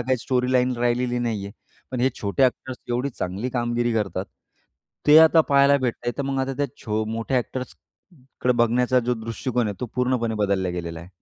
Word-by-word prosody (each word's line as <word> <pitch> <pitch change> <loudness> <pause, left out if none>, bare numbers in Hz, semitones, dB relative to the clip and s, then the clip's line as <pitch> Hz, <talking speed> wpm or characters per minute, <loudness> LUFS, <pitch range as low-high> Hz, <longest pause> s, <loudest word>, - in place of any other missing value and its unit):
काही 130 +2 +1
स्टोरीलाईन 125 +1 +1
राहिलेली 120 +1 0
नाही 115 -4 -2
आहे. 100 - -9 0.4
पण 130 -2 -3
हे 130 - +4
छोटे 100 +6 0
ॲक्टर्स 130 0 -1
एवढी 125 +3 -1
चांगली 100 +1 -4
कामगिरी 120 -1 0
करतात. 100 -4 -1 0.8
ते 150 +1 +9
आता 160 +1 +7
पाहायला 140 0 +5
भेटतय, 120 -1 -2
तर - - 0
मग 135 0 -2
आता 135 +1 -2
त्या 145 - 0 0.2
छो 110 0 -1
मोठ्या 115 +4 -2
ॲक्टर्स 130 +1 -5 0.7
कडे 125 - +3
बघण्याचा 125 +2 +3
जो 125 +1 0
दृष्टिकोन 115 +1 -2
आहे, 105 - -3
तो 125 - -2
पूर्णपणे 125 -3 0
बदलला 100 -3 0
गेलेला 85 -2 -5
आहे. 85 - -12
120 Hz, 180 wpm, -23 LUFS, 110-130 Hz, 0.8 s, ते